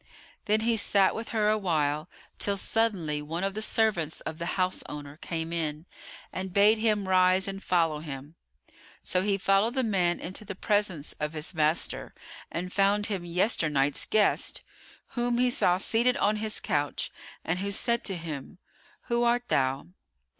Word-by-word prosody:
Then 215 +1 +2
he 230 0 +1
sat 200 -2 +3
with 225 +1 -6
her 215 -2 +1
awhile, 160 -7 0 0.3
till 200 -1 +1
suddenly 190 -10 0
one 165 +5 -4
of 195 0 0
the 215 - -4
servants 210 -8 0
of 160 +1 -6
the 170 +1 -3
houseowner 150 -6 -2
came 165 -1 -4
in 155 -1 -2 0.5
and 190 0 -4
bade 210 +3 +5
him 210 -3 +1
rise 185 0 +4
and 195 0 -5
follow 165 -5 +1
him. 145 -1 -8 0.7
So 180 - +1
he 200 0 +1
followed 195 +5 +2
the 260 - +1
man 185 -6 +1
into 185 +4 -6
the 200 -2 -7
presence 195 -7 0
of 150 +1 -2
his 155 +3 -4
master 155 0 +1 0.4
and 180 +2 -4
found 200 +1 +3
him 185 -3 -4
yesternight's 155 -6 +1
guest, 215 -1 +2 0.5
whom 240 -1 0
he 250 0 +3
saw 180 -9 +3
seated 235 +5 +2
on 210 +1 +2
his 215 0 -2
couch 145 -1 -2 0.3
and 175 +3 -1
who 200 +1 -2
said 235 +3 +1
to 195 - -2
him, 155 -4 -7 0.4
"Who 235 -1 0
art 240 +1 +1
thou?" 135 0 +1
190 Hz, 160 wpm, -28 LUFS, 160-215 Hz, 0.7 s, bade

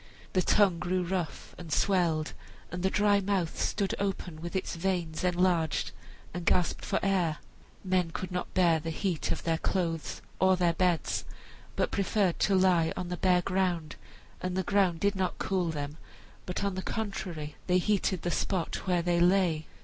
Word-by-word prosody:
The 185 - +3
tongue 190 -3 +3
grew 180 +3 0
rough 175 -2 -3
and 170 -3 -8
swelled, 170 -4 +2 0.4
and 175 - -4
the 190 - +2
dry 205 0 +3
mouth 190 -4 -1
stood 200 -2 0
open 185 -5 -3
with 170 +3 -6
its 190 - -2
veins 170 -2 -1
enlarged 180 -3 +1 0.4
and 175 0 -4
gasped 175 0 +1
for - - -2
the - - -2
air. 180 -6 +1 0.5
Men 185 -3 +1
could 185 +3 -5
not 180 0 -3
bear 170 -3 +4
the 165 +1 -5
heat 165 -2 -1
of - - -3
their 165 -1 0
clothes 165 -4 -2 0.2
or 190 0 +5
their 175 -2 +2
beds, 175 -1 +1 0.5
but - - 0
preferred 195 -2 +1
to 195 - +3
lie 180 -3 +4
on 180 - -3
the 180 - -3
bare 180 -1 +3
ground; 180 -4 0 0.5
and 185 0 -2
the 190 - +1
ground 185 -3 +2
did 200 0 +2
not 190 -1 -1
cool 185 -3 0
them, 145 -1 -4 0.5
but, 180 +2 -3
on 200 -1 0
the 185 - -3
contrary, 180 -9 -4
they 180 0 +4
heated 190 -1 +1
the 175 - -1
spot 185 +1 -2
where 175 -2 +2
they 175 0 +2
lay. 175 -3 +3
180 Hz, 180 wpm, -29 LUFS, 165-190 Hz, 0.5 s, or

